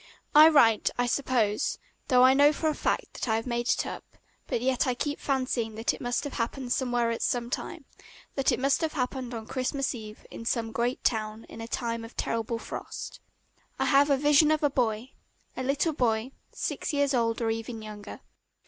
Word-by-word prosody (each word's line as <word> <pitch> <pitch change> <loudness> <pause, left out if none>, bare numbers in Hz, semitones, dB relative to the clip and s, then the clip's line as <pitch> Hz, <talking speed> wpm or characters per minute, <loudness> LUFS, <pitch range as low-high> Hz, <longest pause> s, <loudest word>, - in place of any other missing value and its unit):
I 310 +2 +9
write 230 -8 +5
"I 245 - +2
suppose," 240 -3 0 0.3
though 250 -1 +5
I 260 +1 +7
know 285 +2 +6
for 315 +1 0
a - - 0
fact - - -2
that - - -4
I 220 - +3
have 225 - -2
made 240 -1 -2
it - - +2
up, - - -8 0.3
but - - -1
yet 255 +2 +1
I 250 - +1
keep 290 +3 -3
fancying 255 -5 -1
that 225 +1 0
it - - -9
must 245 0 -1
have 285 - -5
happened 245 +1 -2
somewhere 245 -3 0
at 230 - -3
some 240 -1 -1
time, 320 +1 -5 0.5
that 275 -2 +1
it - - 0
must 275 +1 +2
have 320 -1 -1
happened 255 -2 -3
on 220 -1 -6
Christmas 265 +3 -2
Eve 215 -3 -10
in - - -8
some 230 -1 -1
great 240 +3 -1
town 220 -1 -1
in 225 - -9
a 225 - -6
time 230 -1 -3
of 230 - -12
terrible 230 0 -1
frost. - - -7 0.6
I - - 0
have 285 +1 +4
a 280 - +4
vision 295 +2 +5
of 310 0 +1
a 290 - +3
boy, 240 -1 -1 0.4
a - - -4
little 280 +5 0
boy, 235 -2 0 0.2
six - - -3
years 285 -1 +2
old 230 -2 +1
or 225 -1 0
even 225 0 -5
younger. 210 -1 -9
245 Hz, 205 wpm, -28 LUFS, 230-275 Hz, 0.6 s, I